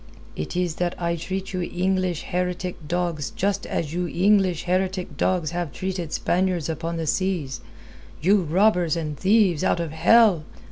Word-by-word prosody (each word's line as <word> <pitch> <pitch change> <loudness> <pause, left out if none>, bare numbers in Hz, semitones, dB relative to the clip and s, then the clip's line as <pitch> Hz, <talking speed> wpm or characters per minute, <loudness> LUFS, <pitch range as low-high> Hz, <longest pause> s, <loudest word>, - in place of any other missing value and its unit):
"It 75 - -5
is 175 -3 -1
that 175 -1 -2
I 170 -1 0
treat 190 +3 -5
you 185 - -1
English 185 -1 -1
heretic 180 -2 -3
dogs 170 -4 -1
just 200 +1 -1
as 155 -1 -2
you 175 0 -1
English 185 -1 +2
heretic 185 -3 -1
dogs 170 +1 0
have 175 -3 -3
treated 180 +2 -4
Spaniards 180 -3 0
upon 165 +1 -3
the 165 - -2
seas 170 -5 -1 0.6
you 195 +5 +4
robbers 175 0 +2
and 155 -3 -3
thieves 190 -2 +3
out - - +2
of 165 -3 -3
hell! 195 +1 +5
175 Hz, 155 wpm, -24 LUFS, 165-185 Hz, 0.6 s, hell